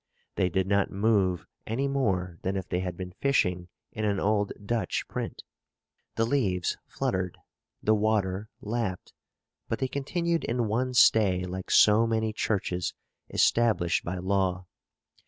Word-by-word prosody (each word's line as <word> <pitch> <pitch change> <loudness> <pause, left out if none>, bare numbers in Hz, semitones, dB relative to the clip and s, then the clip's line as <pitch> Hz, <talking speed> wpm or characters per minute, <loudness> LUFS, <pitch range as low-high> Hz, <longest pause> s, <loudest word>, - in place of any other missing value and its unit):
They 90 - +1
did 95 +1 0
not 100 0 +2
move 100 -3 +1 0.2
any 130 +6 0
more 95 -11 -1
than 95 +1 -2
if 95 -2 -3
they 90 - -1
had 90 -2 -4
been 90 -1 -6
fishing 90 -10 +1 0.2
in 110 - -4
an 100 -2 +1
old 105 0 +1
Dutch 110 -4 -1
print. - - -5 0.7
The 115 - +2
leaves 100 -9 0
fluttered, 90 -1 -2 0.5
the 110 - +4
water 105 -2 0
lapped, 105 -4 -3 0.6
but 115 - 0
they 130 - -1
continued 165 +5 -1
in 120 -1 0
one 125 +4 -1
stay 100 -6 +5
like 95 +1 -6
so 110 +2 +6
many 110 -1 0
churches 90 -5 -1 0.3
established 110 -8 +2
by 90 +2 -3
law. 95 0 0
100 Hz, 140 wpm, -28 LUFS, 90-115 Hz, 0.7 s, so